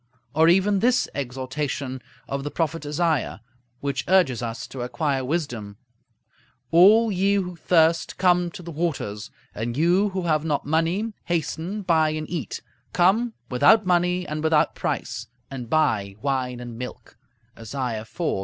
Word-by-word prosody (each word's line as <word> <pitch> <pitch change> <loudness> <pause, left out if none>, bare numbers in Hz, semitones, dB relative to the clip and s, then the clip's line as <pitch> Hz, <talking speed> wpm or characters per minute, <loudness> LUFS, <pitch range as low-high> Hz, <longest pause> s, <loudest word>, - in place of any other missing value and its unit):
Or 160 +2 +5
even 195 +3 +3
this 245 +4 +3
exhortation 130 0 -4 0.3
of 140 0 -3
the 145 - -3
prophet 160 -1 -2
Isaiah, 150 -7 0 0.4
which 140 -2 -2
urges 175 -11 +3
us 115 0 -4
to 130 - -7
acquire 135 +2 -1
wisdom: 125 -9 -3 1.0
"A11 210 +5 +6
ye 195 +2 +2
who 180 -3 -2
thirst, 165 0 +2
come 180 -1 +3
to 180 - -9
the 170 - -7
waters; 140 -10 -3 0.2
and 115 +3 -4
you 180 +6 +3
who 190 -1 -3
have 155 -3 +1
not 150 -3 -1
money, 165 +9 0
hasten, 170 +4 -2
buy 160 -4 +3
and 155 0 -3
eat: 160 - -4 0.3
come, 210 +7 +3 0.2
without 145 - +5
money 180 0 +2
and 150 +1 -4
without 160 -1 +3
price, 115 - -3 0.2
and 125 -4 -6
buy 110 -11 +1
wine 130 -2 -1
and 120 -1 -8
milk" 125 - -8 0.4
(Isaiah 115 -1 -4
iv. 110 - -14
155 Hz, 145 wpm, -24 LUFS, 130-180 Hz, 1.0 s, A11